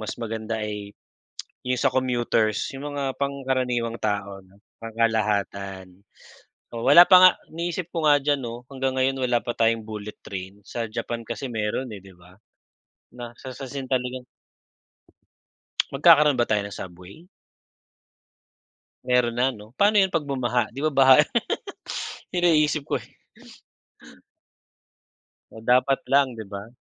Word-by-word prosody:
mas 110 - -5
maganda 115 -1 -4
ay 105 -1 -6 0.7
yung 125 0 -1
sa 125 - +1
commuters' 120 -4 0
yung 140 +2 -6
mga 135 -2 -2
pangkaraniwang 130 -4 -1
tao, 100 -2 -2
no, 95 +1 -23 0.3
pangkalahatan. 105 -4 -1 0.8
Oh, 115 - -4
wala 145 +5 +9
pa 185 - +8
nga 185 0 +9 0.2
iniisip 170 +1 -4
ko 165 - -1
nga 145 -1 +6
diyan, 145 0 +1
'no? 120 +1 -6
Hanggang 135 -1 -2
ngayon 135 +1 +1
wala 120 -1 +2
pa 120 - -2
tayong 115 -1 +2
bullet 105 -1 -7
train 95 +1 -7
sa 120 - -4
Japan 115 +1 -4
kasi 120 +3 -4
meron, 110 +4 -2
eh, - - -9
'di 95 - -14
ba, 90 +1 -19 0.8
na 120 -1 -8
sa 130 - -8
sa 135 - -7
sin 135 -1 -6
talagang 125 -1 -2 1.7
Magkakaroon 150 0 +6
ba 120 - +2
tayo 105 -1 +1
ng 100 - -8
subway? 95 - -11 1.8
Meron 125 -2 +2
na, 125 +2 +2
'no? 110 -1 -11
Paano 205 +6 +3
yun 190 -2 +3
pag 165 - +2
bumaha, 125 -5 -1
di 125 - -18
ba, 155 - 0
baha 135 -1 +7 1.1
iniisip 155 -4 +3
ko, - - -2
eh - - -15 2.4
Oh, 110 0 -13
dapat 130 +3 +3
lang, 135 -4 +3
'di 110 - -7
ba? 100 +3 -9
120 Hz, 140 wpm, -24 LUFS, 110-135 Hz, 2.4 s, wala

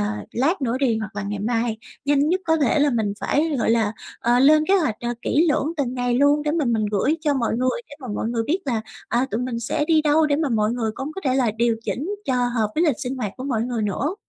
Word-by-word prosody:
ờ, - - +1 0.3
lát 290 +7 0
nữa 240 -1 0
đi 240 -5 +1
hoặc 215 -2 -6
là 205 - -2
ngày 205 +1 -4
mai, 225 +1 -1 0.3
nhanh 285 +1 +2
nhất 365 +3 +1
có 320 -1 +3
thể 295 -1 +2
là 290 0 +3
mình 220 -5 0
phải, 305 0 +1
gọi 225 - +1
là, 225 -2 +2 0.3
ờ, 240 +1 +3
lên 305 +4 +5
kế 390 - +5
hoạch, 310 - +2
ờ, 240 0 -2
kỹ 320 +5 +2
lưỡng 300 +2 +1
từng 260 -4 -1
ngày 245 -1 0
luôn, 285 +2 +4
để 300 - 0
mà 315 -1 0
mình 225 -3 +1
gửi 240 +10 +1
cho 295 -3 +1
mọi 230 -3 0
người 255 - 0
để - - -10
mà 255 - -8
mọi 220 - -2
người 230 -1 -1
biết 340 +5 +1
là, 235 -5 -1 0.3
à, 245 +3 +1
tụi 220 - -1
mình 250 -2 -3
sẽ 265 +5 -1
đi 315 -1 +3
đâu, 305 +1 +3
để 285 -1 +1
mà 310 -2 0
mọi 215 -1 +1
người 230 -3 -1
cũng 275 +5 -5
có 385 - -5
thể 260 -1 +2
là 250 -4 +2
điều 230 +1 +1
chỉnh 330 +11 -3
cho 260 - 0
hợp 225 -3 0
với 335 - +2
lịch 290 -8 +2
sinh 255 +1 -4
hoạt 210 -6 -3
của 255 - -6
mọi 235 -5 0
người 240 -2 -2
nữa. 245 - -1
255 Hz, 275 wpm, -22 LUFS, 230-295 Hz, 0.3 s, lên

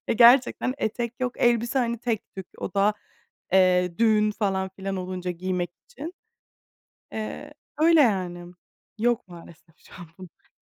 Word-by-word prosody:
Gerçekten 245 +2 +5
etek 235 0 -2
yok, 250 -1 -1
elbise, 240 +2 +2
hani, 235 -1 0
tek 230 -2 -3
tük, 190 -2 -7
o - - -4
da, 200 +1 +3 0.6
eee, 180 -2 +3
düğün 215 -2 +4
falan 195 -3 -1
filan 195 +1 -5
olunca 180 0 -4
giymek 180 0 -3 0.2
için. 355 -8 -8 1.0
Eee, 290 +7 -6 0.2
öyle, 325 +1 +5
yani. 180 -7 0 0.4
Yok 240 -1 0
maalesef 170 -2 -15
şu - - -18
an 170 - -12
bunlar. 185 -2 -15
205 Hz, 135 wpm, -25 LUFS, 180-240 Hz, 1.0 s, Gerçekten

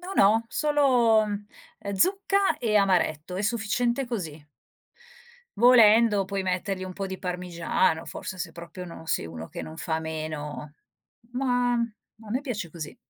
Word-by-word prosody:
No 365 +2 -7
no, 220 - +4
solo, 255 -7 +3
ehm, 205 0 -5 0.5
zucca 390 - +2
e 215 -3 +1
amaretto, 180 -4 +1
è 195 - -2
sufficiente 235 +3 0
così. 165 -11 -5 1.2
Volendo 225 -3 +6
puoi 195 0 -3
mettergli 185 +1 -2
un 185 - -6
po' 195 +1 -4
di 190 0 -6
parmigiano 175 -2 0
forse, 185 - -7
se 170 -2 -4
proprio 170 +2 -9
non 165 -2 -10
sei - - 0
uno 80 0 -8
che - - -7
non 155 - -9
fa 160 0 -2
meno. 155 -2 -5 0.6
Ma 245 -1 +1
a 225 -2 -5
me 250 - 0
piace 215 - -4
così. 155 -2 -8
200 Hz, 145 wpm, -26 LUFS, 170-235 Hz, 1.2 s, Volendo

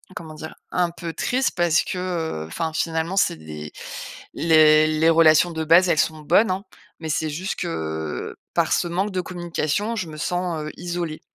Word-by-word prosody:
comment 160 -1 -8
dire? 155 +1 -8 0.2
Un 175 -1 +1
peu 170 -1 -6
triste 255 - 0
parce 175 -2 +3
que, 185 - -4
heu, 170 - -3
enfin 160 - -3
finalement, 165 +3 -1
c'est 195 - +2
des 75 -1 -8 0.6
les 155 -1 +5
les 155 +1 +3
relations 165 +1 +5
de 160 -1 -3
base, 175 +3 +6
elles 155 - +2
sont 155 -1 +1
bonnes 190 +7 +3
hein, 190 +2 -2 0.4
mais 160 -1 -5
c'est 155 +1 0
juste 180 +6 -3
que, 80 - -4 0.2
par - - +2
ce - - +1
manque 190 +4 -1
de 185 -1 -1
communication, 175 +4 -2
je 185 -6 -3
me 155 - -9
sens, 175 -1 -2
heu, 155 - -5
isolée. 175 -3 -4
165 Hz, 185 wpm, -23 LUFS, 155-180 Hz, 0.6 s, base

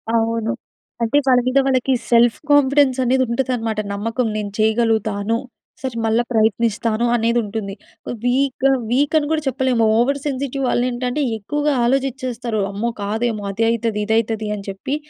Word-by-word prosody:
అవును. 225 0 0 0.5
అంటే, 230 +5 +2
వాళ్ళ 255 -1 +5
మీద 260 +2 +3
వాళ్ళకి 265 0 +2 0.2
సెల్ఫ్ 235 0 +5
కాన్ఫిడెన్స్ 280 -2 +4
అనేది 260 +1 +2
ఉంటదన్నమాట. 235 -3 -1
నమ్మకం 230 +4 -1
నేను 205 -1 -4
చేయగలుగుతాను. 220 -1 +1 0.5
సరే, 260 -3 -4
మళ్ళా 225 +2 +2
ప్రయత్నిస్తాను. 225 +1 +1
అనేది 235 +1 +1
ఉంటుంది. 205 -1 -5 0.5
వీక్‌గా 265 +1 +2 0.2
వీక్ 285 +5 +2
అని 295 -1 0
కూడా 315 -1 +1
చెప్పలేము. 260 -2 +1
ఓవర్ 275 +4 +2
సెన్సిటివ్ 275 -1 -2
వాళ్ళు 245 +1 +1
ఏంటంటే, 250 +4 -2
ఎక్కువగా 295 +7 -1
ఆలోచించేస్తారు. 250 -4 -1
అమ్మో! 220 +4 -2
కాదేమో 220 +1 -2
అదైతది, 225 0 0
ఇదైతది 220 -1 0
అని 200 -1 -8
చెప్పి. 195 +9 -4
235 Hz, 135 wpm, -20 LUFS, 220-260 Hz, 0.5 s, వాళ్ళ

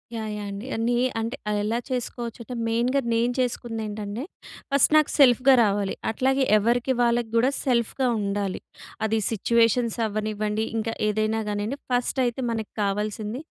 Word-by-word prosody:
Yeah! 220 -1 -4
Yeah! 210 -1 -5
అండి. 200 +5 -6
అన్ని 230 +2 0 0.2
అంటే 230 +3 -3
ఆహ్, 210 - 0
ఎలా 225 +3 0
చేసుకోవచ్చు 240 -2 -4
అంటే 250 - -7
మెయిన్‍గా 240 +4 +1
నేను 235 +2 +1
చేసుకుంది 240 -2 -2
ఏంటంటే, 210 +3 -5 0.5
ఫస్ట్ 280 +1 +4
నాకు 305 -1 +3
సెల్ఫ్‌గా 265 -1 +6
రావాలి. 200 -2 0 0.2
అట్లాగే 265 +4 +1
ఎవరికి 240 +4 +1
వాళ్ళకి 235 -1 +2
కూడా 245 +4 +4
సెల్ఫ్‌గా 250 +1 +1
ఉండాలి. 200 -1 -2 0.5
అది 220 +1 +1
సిట్యుయేషన్స్ 230 +1 +2
అవ్వనివ్వండి. 215 0 -2
ఇంకా 225 +1 -2
ఏదైనా 215 +1 0
కానియ్యండి. 210 +7 -3
ఫస్ట్ 245 +2 0
అయితే 240 +2 -2
మనకు 220 -2 -4
కావాల్సింది. 210 +4 -2
230 Hz, 145 wpm, -25 LUFS, 215-245 Hz, 0.5 s, సెల్ఫ్‌గా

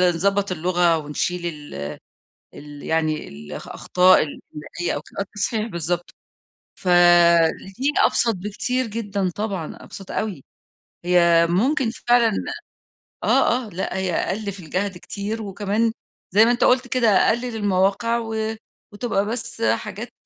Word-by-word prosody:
نضبط 200 +2 +1
اللغة 175 -1 +2
ونشيل 175 +4 -3
ال 145 - -6 0.6
ال 145 0 -11
يعني 155 -1 -1
ال 75 +1 -11
الأخطاء 185 +1 +3
الإملائية 155 +3 -6
أو - - -4
كده. - - -11
آه، - - +1
التصحيح 210 +2 -2
بالضبط، 175 -2 -3 0.6
فالاتنين 175 - +4
أبسط 230 -2 +3
بكتير 230 +6 -2
جدًا 205 -4 -2
طبعًا، 200 -6 -4
أبسط 195 -1 -11
أوي. 200 -11 -3 0.6
هي 170 -2 +5
ممكن 245 - +1 0.2
فعلًا 240 -2 +5 0.9
آه، 245 0 +3
آه، - - -10
لأ، 190 0 -4
هي 190 -2 -1
أقل 200 +2 -2
في 195 - -11
الجهد 185 +3 -3
كتير 210 +4 -5
وكمان 210 +3 -1 0.4
زي 210 +4 +6
ما 235 - +3
أنت 240 - +2
قُلت 250 0 +3
كده، 245 -2 +2
اققل 225 +4 +2
المواقع 205 +3 +1
و 220 -1 -3 0.4
وتبقى 205 -2 -1
بس 230 0 -5
حاجات 220 +2 -1
195 Hz, 130 wpm, -22 LUFS, 175-225 Hz, 0.9 s, زي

